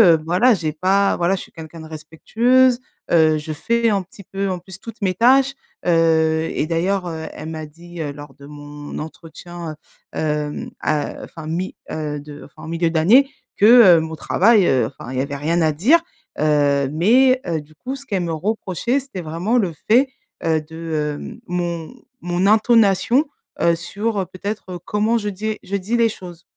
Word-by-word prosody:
heu, - - -2
voilà, 190 +9 +4
j'ai 160 -5 -2
pas, 190 +5 +2
voilà, 175 +2 +1
je - - -6
suis - - -13
quelqu'un 160 0 -10
de 160 - -10
respectueuse, 235 +11 +2 0.3
heu, 160 -2 +4
je 155 +1 -5
fais 235 +8 +1
un 200 -2 +1
petit 195 +2 -14
peu, 195 +1 -3
en 185 - -2
plus, 190 +1 -13
toutes 230 +2 -10
mes 185 - +1
tâches. 265 +7 +4 0.3
Heu 160 -1 +2
et - - -1
d'ailleurs, 180 +4 0
heu, 160 -1 -5
elle 155 +1 -7
m'a 155 -1 -6
dit, 170 +2 -10
heu, 145 -2 -3
lors 145 -1 -11
de 140 +1 -14
mon 145 0 -9
entretien, 165 +1 -8 0.4
heu, - - -3
hem 150 -1 -2
a 150 -1 -1
heu - - -10
enfin 160 -2 -11
mi 175 +4 -3 0.2
heu, 150 -2 -3
de 145 0 -11
enfin 155 +1 -13
milieu 165 +1 0
d'année, 200 - +4 0.3
que, 205 - +4 0.3
heu, - - +3
mon 160 0 -5
travail, 200 +4 +3
heu, 125 -4 +2
enfin, 125 - -10
il 130 - -2
y - - +2
avait 140 +1 -4
rien 165 +4 0
à 155 -1 +3
dire, 240 - +4 0.4
heu. 145 -2 +2
Mais, 255 - +4
heu, 165 -3 -2
du 150 +1 -20
coup 255 - -6
ce 275 0 -12
qu'elle 195 -6 -1
me 170 -1 -2
reprochait 210 - -1
c'était 255 -9 -8
vraiment 170 +9 -1
le 185 -6 0 0.2
fait, 250 +5 +5 0.4
heu, 160 -1 +1
de, 155 -1 -4
hem - - -9
mon 175 +1 -3 0.3
mon 175 +2 0
intonation, 220 +3 +4 0.4
heu, 170 0 +4
sur, 205 +6 -3
heu, 190 - -1
peut-être, 185 +1 -6
heu, 175 - -6
comment 215 +3 +1
je 210 -2 -2
dis 215 +2 -4
je 200 - -4
dis 200 +5 -2
les 230 -1 +3
choses. 175 -4 -10
175 Hz, 195 wpm, -20 LUFS, 155-210 Hz, 0.4 s, fait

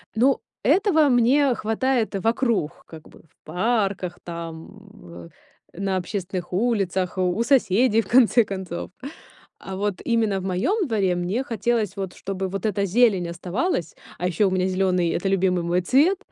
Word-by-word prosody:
Ну, 260 +4 +3 0.2
этого 315 - +3
мне 255 +2 +3
хватает 225 +1 -1
вокруг, 225 - -1
как 160 -2 -13
бы, - - -18
в 160 - -34
парках, 195 -4 -1
там, 170 +3 -8 0.3
э, 85 -1 -11 0.4
на 190 +1 -2
общественных 185 -1 -4
улицах, 190 -4 0
у 185 +5 +1
соседей, 230 -3 +3
в - - -15
конце 240 -1 +5
концов. 190 -4 -6 0.7
А 190 - -7
вот 205 -1 -2
именно 220 -5 +1
в - - -8
моем 315 - 0
дворе 195 -6 +1
мне 185 +9 -2
хотелось 230 -5 -1
вот, 190 -2 -5
чтобы 195 -1 -4
вот 195 +2 -3
эта 200 -1 0
зелень 200 -3 +2
оставалась. 180 - -2 0.2
А 180 - -2
ещё 190 +3 +2
у - - -2
меня 185 0 +1
зеленый- 185 -2 +1
это 185 +4 -1
любимый 185 -2 +1
мой 175 +1 0
цвет. 295 - +3
195 Hz, 155 wpm, -23 LUFS, 180-235 Hz, 0.7 s, конце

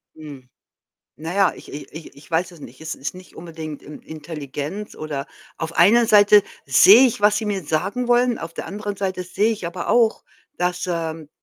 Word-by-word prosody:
Hm. 145 -5 -12 0.7
Na 160 +3 -6
ja, 195 -2 +3
ich - - -13
i 145 - -7
ich 160 +1 -11
ich 145 +3 -17
weiß 170 +2 0
es 165 - -15
nicht. 130 -1 -12
Es 160 0 -5
ist 140 - -6
nicht 185 0 -14
unbedingt 160 -3 -8
In 150 - -11
Intelligenz 155 +4 -7
oder 145 -2 -5 0.3
auf 165 0 -4
einer 235 +2 +5
Seite 205 -1 +6 0.2
sehe 195 - +7
ich, 225 - -3
was 210 0 +4
sie 220 - -2
mir 200 -3 -2
sagen 195 +11 -2
wollen, 245 -1 +3
auf 165 0 -8
der - - -6
anderen 205 0 -5
Seite 190 -1 -3
sehe 200 +5 0
ich 205 -5 -6
aber 175 +1 -6
auch, 230 -2 +2 0.3
dass, 180 0 -2
ähm 165 -3 -4
175 Hz, 195 wpm, -21 LUFS, 155-205 Hz, 0.7 s, sehe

